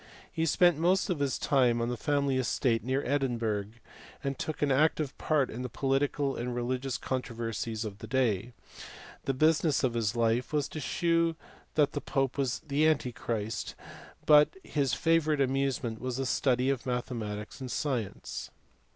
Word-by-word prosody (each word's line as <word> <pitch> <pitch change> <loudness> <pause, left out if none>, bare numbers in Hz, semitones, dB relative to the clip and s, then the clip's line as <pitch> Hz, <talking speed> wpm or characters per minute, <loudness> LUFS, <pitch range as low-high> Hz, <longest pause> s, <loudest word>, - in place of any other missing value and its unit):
He 165 0 0
spent 175 0 +4
most 185 +4 +2
of 170 - -1
his 140 -2 0
time 125 -4 +3
on 115 +1 0
the 125 - -1
family 140 +2 +1
estate 120 -2 +1
near 130 +3 -1
Edinburgh, 120 -7 0 0.6
and 140 -1 -1
took 155 -1 -3
an 145 - +2
active 150 0 +2
part 145 -4 +1
in 120 - -5
the 125 - -4
political 135 +2 0
and 120 +1 -3
religious 130 +2 -2
controversies 115 -3 -3
of 100 -2 -7
the 110 - -8
day; 120 -3 +1 0.7
the 135 - +1
business 155 0 +3
of 125 -3 +2
his 115 -1 0
life 115 +1 +1
was 145 -2 +1
to 155 - -6
shew 165 +2 +1 0.4
that 150 -2 +3
the 145 - -3
pope 135 0 -1
was 125 -4 -1
antichrist, 125 -7 0 0.5
but 150 - +6
his 140 -4 0
favourite 160 -2 +2
amusement 135 -4 0
was 130 -1 -3
the 135 - -1
study 130 0 +2
of 130 -1 -3
mathematics 115 -3 -4
and 130 - -5
science. 125 -9 -3
130 Hz, 160 wpm, -30 LUFS, 120-145 Hz, 0.7 s, but